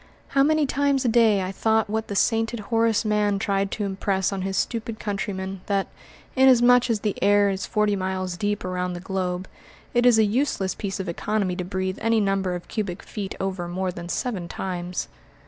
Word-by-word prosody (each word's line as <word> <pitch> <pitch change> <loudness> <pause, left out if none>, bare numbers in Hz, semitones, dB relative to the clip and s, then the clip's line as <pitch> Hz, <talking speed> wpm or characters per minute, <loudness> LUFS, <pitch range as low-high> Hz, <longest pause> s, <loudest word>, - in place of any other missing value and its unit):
How 275 - +3
many 310 +1 +3
times 280 -1 +1
a - - +3
day 220 -4 +4
I 185 - -3
thought 220 +2 +1
what 220 +1 -2
the 200 - -4
sainted 225 +2 +1
Horace 225 -1 +2
Mann 210 -1 +2
tried 195 0 0
to 210 - -2
impress 195 0 -1
on 195 - -3
his 190 0 -2
stupid 230 0 -2
countrymen, 195 -2 -4
that, 200 -1 0 0.5
inasmuch 250 -2 +6
as 220 -3 0
the 210 -2 -1
air 205 0 +4
is 190 0 -3
forty 210 -1 +1
miles 185 -1 -2
deep 205 +1 -2
around 180 0 -2
the 175 - -5
globe, 185 0 -3 0.5
it 240 +1 +4
is 240 -2 +6
a 220 - +5
useless 210 -3 0
piece 200 -2 -4
of 190 - -4
economy 190 +2 -1
to 180 - -3
breathe 185 0 -3
any 225 0 +3
number 195 -3 0
of 175 - -8
cubic 200 -4 -4
feet 200 -3 -5
over 190 -2 -3
more 185 +1 -2
than 175 -1 -8
seven 195 -5 -2
times! 180 0 -4
200 Hz, 195 wpm, -24 LUFS, 190-225 Hz, 0.5 s, inasmuch